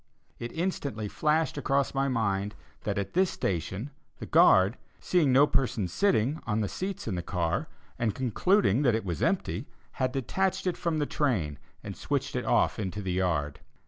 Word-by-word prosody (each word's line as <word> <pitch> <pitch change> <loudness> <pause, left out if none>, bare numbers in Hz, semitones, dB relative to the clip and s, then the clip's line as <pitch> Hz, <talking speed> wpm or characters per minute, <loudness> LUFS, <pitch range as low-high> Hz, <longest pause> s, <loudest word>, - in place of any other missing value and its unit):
It 120 0 -5
instantly 145 - -2
flashed 155 +5 0
across 140 0 +1
my 135 0 +1
mind 105 -5 -1 0.3
that 105 -1 -1
at 100 -1 -3
this 185 +1 +3
station, 95 - -3 0.3
the - - -7
guard, 95 +5 +5 0.2
seeing 165 -7 +2
no 135 +3 +7
person 125 -9 0
sitting 140 - +1
on 110 -1 +1
the 105 - 0
seats 190 - -5
in 110 - -1
the 90 - -2
car, 90 - -1 0.3
and 115 -4 0
concluding 130 - +2
that 120 -6 +3
it 110 - -2
was 85 -5 -3
empty, - - 0 0.2
had 130 -1 -1
detached 185 +11 -1
it 180 - 0
from 170 -2 -1
the 150 - +1
train, 95 - -1 0.2
and 100 -3 -6
switched 140 -2 -2
it 125 - -2
off - - +2
into 95 -1 -3
the 95 - -2
yard. 80 -6 0
120 Hz, 175 wpm, -28 LUFS, 95-145 Hz, 0.3 s, no